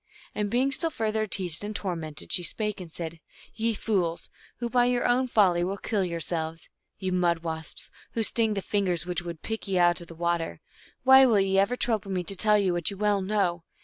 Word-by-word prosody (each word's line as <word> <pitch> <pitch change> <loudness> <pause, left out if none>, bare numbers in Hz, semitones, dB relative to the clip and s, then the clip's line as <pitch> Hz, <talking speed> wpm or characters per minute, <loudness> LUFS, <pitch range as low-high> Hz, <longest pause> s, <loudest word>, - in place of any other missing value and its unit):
And 210 -1 -2
being 255 +5 +1
still 330 +4 +2
further 220 -5 -1
teased 185 -3 0
and 210 +1 -5
tormented, 165 -7 -4
she 180 - +2
spake 210 +4 -2
and 170 -3 -9
said, 165 0 -6 0.2
" - - -22
Ye 230 -1 +2
fools, 180 -7 -1 0.3
who 240 - -3
by 245 0 +3
your 245 0 +1
own 255 +2 +2
folly 185 -7 +3
will 195 +3 -2
kill 200 0 -1
yourselves; 165 -2 -3 0.3
ye 185 -1 -3
mud 175 -2 +1
wasps, 160 -1 -6 0.2
who 225 - 0
sting 220 -1 +2
the 195 - -3
fingers 185 -5 +1
which 175 -1 -2
would 170 -2 -8
pick 220 -1 -4
ye 190 -1 0
out 175 0 +3
of 170 - -10
the 165 - -11
water, 170 0 -2 0.4
why 265 0 +8
will 220 -4 +4
ye 195 0 +2
ever 230 +6 +1
trouble 215 -6 -1
me 185 -2 -1
to 195 +3 -3
tell 210 +2 +4
you 190 -3 +1
what 175 -2 0
you 200 - -7
well 205 -1 +1
know 190 -4 0
195 Hz, 215 wpm, -27 LUFS, 175-215 Hz, 0.4 s, why